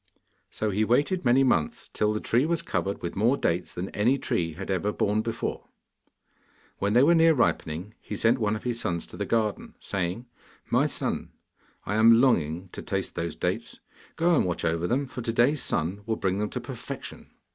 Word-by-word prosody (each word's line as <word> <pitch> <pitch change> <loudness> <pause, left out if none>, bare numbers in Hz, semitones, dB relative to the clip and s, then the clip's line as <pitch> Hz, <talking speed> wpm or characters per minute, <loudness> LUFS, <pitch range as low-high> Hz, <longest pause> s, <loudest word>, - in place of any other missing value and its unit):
So 110 -1 -2
he 105 +3 +1
waited 145 - +1
many 130 +2 +4
months, 85 - 0
till 105 0 0
the 105 - -1
tree 125 +8 +2
was 170 0 0
covered 95 - -2
with 85 - -4
more 115 +7 +3
dates 85 +1 -1
than 90 +2 -4
any 120 +6 +2
tree 85 - -1
had 95 +4 -5
ever 95 +2 0
borne 105 +1 +1
before. 115 0 -4 1.1
When 100 +1 0
they 125 +3 +6
were 165 +4 +6
near 165 -1 +5
ripening 90 - -1
he - - -6
sent 115 +3 +2
one 105 -1 +1
of 110 - -7
his 120 -2 -2
sons 85 -5 -2
to - - -12
the - - -3
garden: 110 -3 -1
saying, 95 +5 -3 0.5
'My - - +3
son, - - -3 0.5
I 100 - -2
am 115 +1 +7
longing 90 - +1
to - - -7
taste 95 -4 -3
those 85 -1 -3
dates: - - -3 0.4
go 170 +1 +3
and - - +3
watch 90 -1 -2
over 85 +1 0
them, 135 +6 0
for 125 -1 -7
to 115 - -1
day's 125 +5 +3
sun 90 +6 -1
will 110 - +1
bring 95 -1 -1
them 105 0 -1
to - - -4
perfection. - - -8
105 Hz, 200 wpm, -27 LUFS, 90-125 Hz, 1.1 s, am